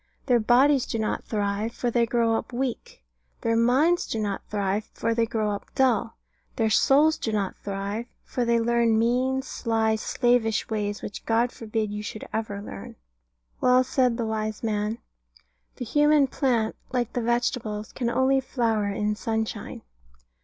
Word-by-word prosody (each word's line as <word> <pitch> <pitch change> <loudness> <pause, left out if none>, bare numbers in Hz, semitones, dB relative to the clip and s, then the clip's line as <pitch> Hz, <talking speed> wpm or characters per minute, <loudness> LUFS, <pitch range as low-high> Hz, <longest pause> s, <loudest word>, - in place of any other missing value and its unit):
Their 245 -3 +4
bodies 255 +4 +4
do - - -2
not 220 -1 -2
thrive; 210 +1 -2
for 245 -1 -2
they 235 0 +2
grow 230 -1 +2
up 225 - -2
weak. 245 - -4 0.4
Their 230 0 +1
minds 265 +10 +3
do 225 - -3
not 205 -2 -2
thrive; 205 0 -1
for 230 - 0
they 230 0 +1
grow 215 -2 -1
up 205 - -5
dull. 240 -4 +1 0.4
Their 220 -2 +1
souls 295 +7 +4
do 225 - -2
not 200 -3 -1
thrive; 200 +3 -4 0.2
for 250 - -2
they 235 0 +2
learn 230 -1 +2
mean, 255 +3 +1
sly, 225 -5 0
slavish 230 0 +1
ways, 205 -1 -2
which 205 - -6
God 235 +2 +2
forbid 220 -2 -3
you 210 0 -4
should 215 +1 -7
ever 210 -2 -3
learn. 100 - -9 0.7
Well 255 0 +5
said 255 -2 +1
the 235 - -1
wise 215 0 -3
man, 210 0 -1 0.8
"The 245 - -5
human 295 +3 +4
plant, 245 -5 0 0.2
like 245 -3 -1
the 245 - -1
vegetables, 230 -2 -1
can 240 -3 -2
only 260 +2 +3
flower 225 -5 0
in 210 +1 -1
sunshine." 220 0 -3
230 Hz, 160 wpm, -25 LUFS, 215-245 Hz, 0.8 s, Well